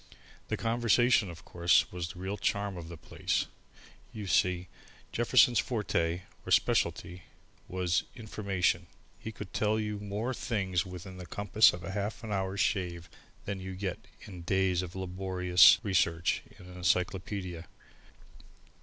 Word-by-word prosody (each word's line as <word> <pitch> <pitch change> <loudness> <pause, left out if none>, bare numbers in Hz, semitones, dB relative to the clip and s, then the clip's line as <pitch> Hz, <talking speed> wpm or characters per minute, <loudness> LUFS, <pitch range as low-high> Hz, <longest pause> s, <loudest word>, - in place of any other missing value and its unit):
The - - -2
conversation, 120 -2 +3
of 85 -2 -11
course, 85 0 +3
was 90 -1 -4
the 90 - -10
real 95 +2 -3
charm 100 0 -1
of 85 -2 -7
the 85 0 -9
place. - - -1 0.7
You 105 -2 -6
see, 90 +1 +2 0.4
Jefferson's 120 -1 +4
forte, 90 -6 -1 0.2
or - - -7
specialty, 90 +1 +1 0.4
was 90 -1 0
information. 100 -6 -1 0.3
He 110 - -6
could 95 - -9
tell 110 +1 +1
you 105 -1 -3
more 105 +5 -3
things 95 -7 -1
within 90 +1 -8
the 90 -1 -9
compass 100 +5 +4
of 90 0 -8
a 85 - -5
half 105 +4 -3
hour's 95 -2 -2
shave 90 -5 -1 0.3
than 100 -1 -3
you 95 0 -6
get 95 -1 -3 0.3
in 90 -4 -9
days 95 0 +1
of 90 -1 -7
laborious 90 -1 +5
research 85 -5 +1 0.2
in 90 - -14
an 90 0 -11
encyclopaedia. 90 -1 -1
95 Hz, 140 wpm, -30 LUFS, 90-105 Hz, 0.7 s, laborious